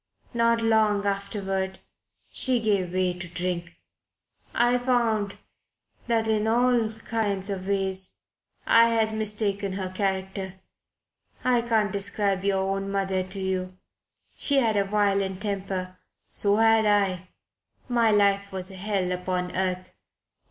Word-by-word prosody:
Not 230 Hz, 0 st, +2 dB
long 215 Hz, -2 st, +2 dB
afterward 195 Hz, -1 st, -2 dB, 0.5 s
she 255 Hz, -2 st, +3 dB
gave 200 Hz, -5 st, 0 dB
way 185 Hz, -1 st, +1 dB
to 175 Hz, 0 st, -8 dB
drink. 175 Hz, 0 st, -4 dB, 0.8 s
I 240 Hz, +1 st, +2 dB
found 230 Hz, -5 st, 0 dB, 0.7 s
that 225 Hz, -1 st, +1 dB
in 215 Hz, 0 st, +1 dB
all 240 Hz, 0 st, +3 dB, 0.2 s
kinds 205 Hz, -3 st, -1 dB
of 190 Hz, -1 st, -5 dB
ways 190 Hz, -1 st, -2 dB, 0.4 s
I 230 Hz, 0 st, +6 dB
had 220 Hz, -1 st, +1 dB
mistaken 210 Hz, -2 st, -1 dB
her 190 Hz, -1 st, -3 dB
character. 190 Hz, 0 st, -3 dB, 0.9 s
I 250 Hz, -1 st, +3 dB
can't 220 Hz, -3 st, +1 dB
describe 200 Hz, -1 st, -1 dB
your 195 Hz, -1 st, +1 dB
own 195 Hz, 0 st, -2 dB
mother 195 Hz, -1 st, 0 dB
to 190 Hz, +2 st, -4 dB
you. 185 Hz, -1 st, -3 dB, 0.6 s
She 285 Hz, -, +3 dB
had 230 Hz, -5 st, +3 dB
a 200 Hz, -1 st, +2 dB
violent 195 Hz, -2 st, 0 dB
temper. 190 Hz, -2 st, -4 dB, 0.3 s
So 200 Hz, 0 st, +3 dB
had 225 Hz, 0 st, +4 dB
I. 190 Hz, -3 st, +1 dB, 0.6 s
My 235 Hz, -2 st, +3 dB
life 200 Hz, -1 st, +2 dB
was 190 Hz, 0 st, -2 dB
a -, -, -9 dB
hell 190 Hz, -2 st, -1 dB
upon 180 Hz, 0 st, -2 dB
earth. 185 Hz, -1 st, -2 dB
200 Hz, 130 wpm, -26 LUFS, 190-220 Hz, 0.9 s, I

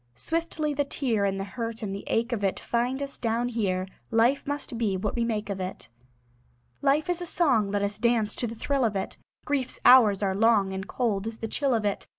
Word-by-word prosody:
Swiftly 320 Hz, -, -1 dB
the 285 Hz, 0 st, +1 dB
tear 245 Hz, -7 st, 0 dB
And 195 Hz, 0 st, -1 dB
the -, -, -2 dB
hurt 230 Hz, +3 st, -5 dB
and 195 Hz, -2 st, -3 dB
the 200 Hz, -, -6 dB
ache 230 Hz, +2 st, 0 dB
of 220 Hz, -4 st, -2 dB
it 195 Hz, -, 0 dB
Find 250 Hz, +4 st, -1 dB
us 280 Hz, 0 st, -6 dB
down 235 Hz, +1 st, 0 dB
here; 190 Hz, -6 st, -1 dB, 0.2 s
Life 235 Hz, +5 st, +2 dB
must 285 Hz, -5 st, -3 dB
be 205 Hz, -5 st, 0 dB
what 205 Hz, +3 st, -2 dB
we 235 Hz, -, +1 dB
make 220 Hz, -2 st, -2 dB
of 200 Hz, -2 st, -4 dB
it. 185 Hz, -8 st, -5 dB, 0.9 s
Life 285 Hz, +2 st, +2 dB
is 355 Hz, 0 st, -1 dB
a 350 Hz, -, -4 dB
song; 265 Hz, -, +2 dB
Let 200 Hz, 0 st, 0 dB
us 205 Hz, +1 st, -1 dB
dance 235 Hz, -2 st, +2 dB
to 240 Hz, -, -1 dB
the 230 Hz, -, -6 dB
thrill 275 Hz, +4 st, 0 dB
of 220 Hz, -3 st, +1 dB
it. 195 Hz, -, -3 dB, 0.3 s
Grief's 275 Hz, -4 st, 0 dB
hours 215 Hz, -6 st, +7 dB
are 190 Hz, -1 st, +1 dB
long, 205 Hz, -2 st, +3 dB
And 190 Hz, 0 st, -5 dB
cold 215 Hz, -5 st, -1 dB
is 225 Hz, 0 st, -4 dB
the 225 Hz, -, -4 dB
chill 275 Hz, +1 st, 0 dB
of 220 Hz, -2 st, -1 dB
it. 205 Hz, -, -2 dB
230 Hz, 225 wpm, -27 LUFS, 200-260 Hz, 0.9 s, hours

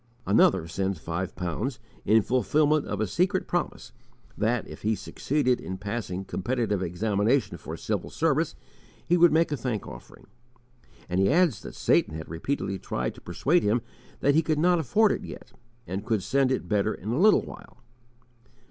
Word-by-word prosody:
Another 80 Hz, -, +4 dB
sends 95 Hz, +2 st, -2 dB
five 85 Hz, +4 st, -4 dB
pounds 100 Hz, -, -3 dB, 0.3 s
in 110 Hz, +1 st, +4 dB
fulfillment 145 Hz, +5 st, +2 dB
of 105 Hz, -, -3 dB
a 110 Hz, -, +1 dB
secret 180 Hz, -, 0 dB
promise 175 Hz, -, -3 dB, 0.4 s
that, 110 Hz, +2 st, 0 dB
if -, -, -10 dB
he 110 Hz, +1 st, +1 dB
succeeded 130 Hz, +6 st, -1 dB
in 95 Hz, -, -5 dB
passing 100 Hz, -2 st, -4 dB
competitive 110 Hz, -2 st, -1 dB
examination 105 Hz, +7 st, 0 dB
for -, -, -7 dB
civil -, -, -3 dB
service, -, -, 0 dB, 0.5 s
he 175 Hz, -, +4 dB
would 175 Hz, -1 st, +6 dB
make 160 Hz, +1 st, +3 dB
a -, -, +1 dB
thank 115 Hz, -4 st, -3 dB
offering. -, -, -12 dB, 0.8 s
And 90 Hz, +1 st, -1 dB
he 95 Hz, -, +4 dB
adds 165 Hz, -, +3 dB
that -, -, -9 dB
Satan 80 Hz, -, +2 dB
had 80 Hz, -, -7 dB
repeatedly 95 Hz, -, -3 dB
tried 60 Hz, -, -3 dB
to -, -, -15 dB
persuade 170 Hz, +5 st, +1 dB
him 110 Hz, +3 st, +1 dB, 0.4 s
that 145 Hz, -, +4 dB
he 160 Hz, -, +4 dB
could 155 Hz, -1 st, 0 dB
not 175 Hz, +2 st, +3 dB
afford 205 Hz, -, +3 dB
it -, -, -2 dB
yet, -, -, -10 dB, 0.3 s
and 95 Hz, +3 st, -4 dB
could 110 Hz, -4 st, -1 dB
send 135 Hz, +4 st, +2 dB
it 130 Hz, -, -1 dB
better 105 Hz, 0 st, +1 dB
in 105 Hz, -, -7 dB
a 120 Hz, +6 st, 0 dB
little 215 Hz, +3 st, +5 dB
while. -, -, -12 dB
110 Hz, 175 wpm, -27 LUFS, 95-150 Hz, 0.8 s, would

